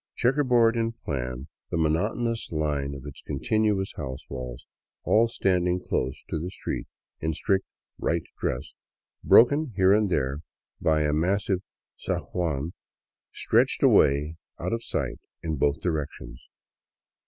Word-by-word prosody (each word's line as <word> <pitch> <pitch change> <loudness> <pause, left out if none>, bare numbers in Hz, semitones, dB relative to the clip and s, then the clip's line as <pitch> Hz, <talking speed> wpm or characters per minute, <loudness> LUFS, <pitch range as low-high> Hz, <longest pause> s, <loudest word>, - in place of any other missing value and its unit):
Checkerboard 125 -3 +3
in 115 0 0
plan, 65 - -4 0.2
the - - -1
monotonous 105 +9 0
line 75 -3 -1
of 70 0 -9
its 70 - -9
continuous 100 - 0
liouse 65 -4 -6
walls, 60 -2 -6 0.4
all 115 +2 +4
standing 90 -5 +1
close 65 -7 -2
to 80 - -2
the 85 +3 -4
street 95 - -5 0.3
in 80 - -1
a 80 - -1
strict 95 +1 +1 0.2
" - - -43
right 85 0 +1 0.2
dress," 60 - -2 0.5
broken 145 +2 +5
here 95 0 +5
and 105 -1 +3
there 70 -4 0 0.4
by 80 -1 +3
a 75 0 +1
massive 95 +4 +1 0.4
zaguan, 80 -3 -2 0.6
stretched - - +2
away 75 +3 +4 0.2
out - - -2
of 115 0 -2
sight - - -3 0.2
in 80 -1 -1
both 70 +1 +2
directions. 75 -7 -4
85 Hz, 135 wpm, -26 LUFS, 70-105 Hz, 0.6 s, broken